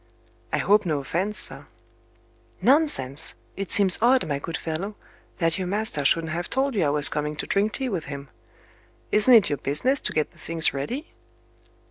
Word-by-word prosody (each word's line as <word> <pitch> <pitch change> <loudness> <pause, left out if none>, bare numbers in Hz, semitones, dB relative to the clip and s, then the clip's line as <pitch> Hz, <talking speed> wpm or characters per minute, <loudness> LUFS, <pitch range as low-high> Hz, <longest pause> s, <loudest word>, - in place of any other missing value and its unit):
"I - - 0
hope 210 +1 +3
no 160 -5 -1
offence, 175 +9 -3
sir." - - -4 0.9
"Nonsense! 200 - +1 0.2
It 195 -1 -6
seems 195 -3 +4
odd, 250 +2 +3
my 140 -2 -2
good 165 +3 -5
fellow, 175 +6 -5 0.4
that 165 0 -1
your 185 - -3
master 200 -6 -2
shouldn't 160 +3 +1
have 175 +1 -4
told 270 +1 0
you 200 -6 0
I - - +1
was 145 0 +8
coming 150 0 -2
to 150 - -4
drink 205 +2 0
tea 265 - 0
with 185 -10 -4
him. 140 -1 -8 0.8
Isn't 225 +4 +6
it 215 -5 +5
your 145 - -2
business 250 - -1
to - - -1
get 155 -1 -1
the - - -23
things 165 -1 0
ready?" 240 - -5
175 Hz, 180 wpm, -24 LUFS, 150-215 Hz, 0.9 s, was